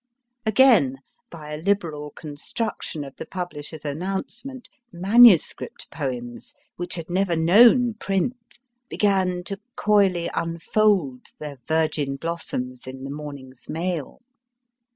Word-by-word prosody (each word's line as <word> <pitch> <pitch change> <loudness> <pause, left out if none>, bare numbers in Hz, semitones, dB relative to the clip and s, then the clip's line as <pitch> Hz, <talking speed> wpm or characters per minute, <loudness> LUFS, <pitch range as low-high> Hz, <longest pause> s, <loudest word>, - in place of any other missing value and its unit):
Again, 220 - +5 0.3
by 150 -3 -9
a - - -3
liberal 160 -4 -1
construction 155 +3 -5
of 135 -1 -10
the - - -6
publisher 170 -5 -6
s 155 - -12
announcement, 195 - -5 0.2
manuscript 195 +1 +4
poems, 125 -5 -5 0.2
which 175 0 -3
had 165 -2 -6
never 180 0 +1
known 230 +9 +6
print, 215 +3 -3 0.3
began 190 -3 +1
to 195 +2 -6 0.2
coyly 200 -7 +3
unfold 165 -4 0
their 145 -3 -8
virgin 155 -3 0
blossoms 135 -6 -4
in 130 0 -8
the 135 - -5
morning 140 -3 -8
s 130 - -20
mail. 165 -2 -3
170 Hz, 115 wpm, -24 LUFS, 145-200 Hz, 0.3 s, known